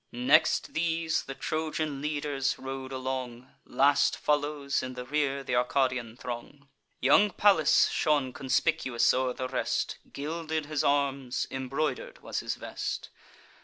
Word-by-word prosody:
Next 145 +6 +3
these, 165 0 0
the 135 - -6
Trojan 155 -2 -2
leaders 145 -2 -1
rode 135 0 -6
along; 130 -1 -5
Last 140 +3 +3
follows 145 -1 0
in 130 0 -6
the 125 0 -6
rear 140 0 0
th' 130 - -6
Arcadian 125 -2 0
throng. 130 +4 -7 0.3
Young 150 +11 +5
Pallas 195 -4 +4
shone 145 -4 +1
conspicuous 130 -2 +1
o'er 130 0 0
the 130 - -4
rest; 130 -1 -1
Gilded 160 +1 -3
his 150 -1 -1
arms, 140 -3 +1
embroider'd 135 +1 -3
was - - -3
his - - -3
vest. - - -5
140 Hz, 130 wpm, -29 LUFS, 130-150 Hz, 0.3 s, Young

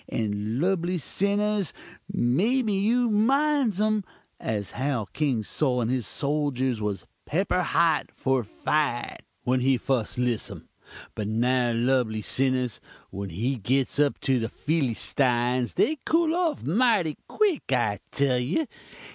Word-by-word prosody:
And 105 +1 -2
lubly 180 +1 +1
sinnahs, 200 +3 0 0.4
maybe 210 - +2
you 230 +4 +2
minds 265 0 +2
um, 215 -1 +2 0.4
as 105 -3 -3
how 130 -4 -1
King 135 -8 0
Sol 125 +3 0
and 120 0 0
his 130 -4 -1
soljurs 140 -5 0
was 100 -3 -3 0.2
pepper - - +1
hot - - +2
for 130 -2 0
fite 130 +2 -1 0.2
when 125 +1 +2
he 130 +1 +3
fust 120 -2 -1
liss 120 -3 -1
um; - - -10 0.5
but 105 - -4
now, 120 +2 +2
lubly 115 -2 +1
sinnahs, 130 -2 0 0.3
when 100 +1 -5
they 115 +9 -2
gits 130 +6 0
up 145 -1 +2
to 135 -3 +2
the 115 - -2
Fillystines, 125 -4 0
they 310 -1 +2
cool 325 0 +2
off 340 -3 0
mighty 200 - +2
quick, 405 - 0
I 110 -6 +1
tell 135 -3 +2
you! 155 - 0
135 Hz, 135 wpm, -26 LUFS, 120-200 Hz, 0.5 s, he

